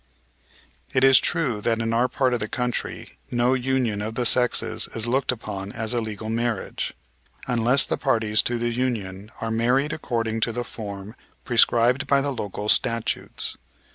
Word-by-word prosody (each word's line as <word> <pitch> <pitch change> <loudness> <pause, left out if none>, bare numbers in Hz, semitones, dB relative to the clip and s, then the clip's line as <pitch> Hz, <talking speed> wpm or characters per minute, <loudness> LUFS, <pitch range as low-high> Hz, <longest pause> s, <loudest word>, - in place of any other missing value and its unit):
"It 130 - +4
is 135 -1 +8
true 135 -11 0
that 115 +1 0
in 115 0 -1
our 120 +2 +3
part 130 -1 0
of 120 - 0
the 105 - -3
country 125 +1 -4
no 120 +1 +2
union 125 -5 0
of 110 +2 -4
the 125 - -1
sexes 125 +1 +3
is 115 -1 0
looked 130 +3 +1
upon 100 -4 -6
as 110 +1 -1
a 120 - 0
legal 110 -1 -5
marriage 115 -2 -2 0.5
unless 125 +3 +3
the - - -2
parties 110 -1 +2
to 120 - -1
the 120 0 -1
union 110 -5 -3
are 115 0 -2
married 125 +6 +1
according 115 -7 -2
to 115 +1 +1
the 120 +2 -3
form 100 -3 -6 0.3
prescribed 120 +2 +3
by 140 0 +4
the 140 +1 -1
local 105 -4 -5
statutes. 115 +1 +1
115 Hz, 170 wpm, -24 LUFS, 110-125 Hz, 0.5 s, is